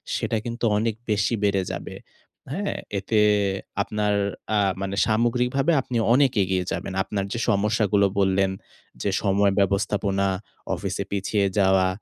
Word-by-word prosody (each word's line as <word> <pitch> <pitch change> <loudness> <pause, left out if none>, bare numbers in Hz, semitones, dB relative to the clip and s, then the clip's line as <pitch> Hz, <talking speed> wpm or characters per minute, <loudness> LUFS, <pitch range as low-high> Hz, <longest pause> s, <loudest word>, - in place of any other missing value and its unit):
সেটা 110 - -1
কিন্তু 120 0 -3
অনেক 110 0 0 0.2
বেশি 100 +3 +1
বেড়ে 100 -2 +2
যাবে। - - -6 0.6
হ্যাঁ? 200 +7 -2 0.2
এতে 105 +3 0 0.6
আপনার 105 0 -1 0.4
আ - - +3 0.2
মানে 100 0 -3
সামগ্রিকভাবে 125 +6 +1
আপনি 125 -2 -3 0.2
অনেক 135 0 +4
এগিয়ে 95 -1 -1
যাবেন। 85 +3 -4
আপনার 100 -1 -3
যে 120 - -3
সমস্যাগুলো 105 0 +2
বললেন 95 0 +2 0.5
যে, - - 0
"সময় 100 0 +3
ব্যবস্থাপনা, 100 0 +1 0.5
অফিসে - - -3
পিছিয়ে 100 +1 0
যাওয়া, 95 -1 +4
100 Hz, 130 wpm, -24 LUFS, 95-115 Hz, 0.6 s, অনেক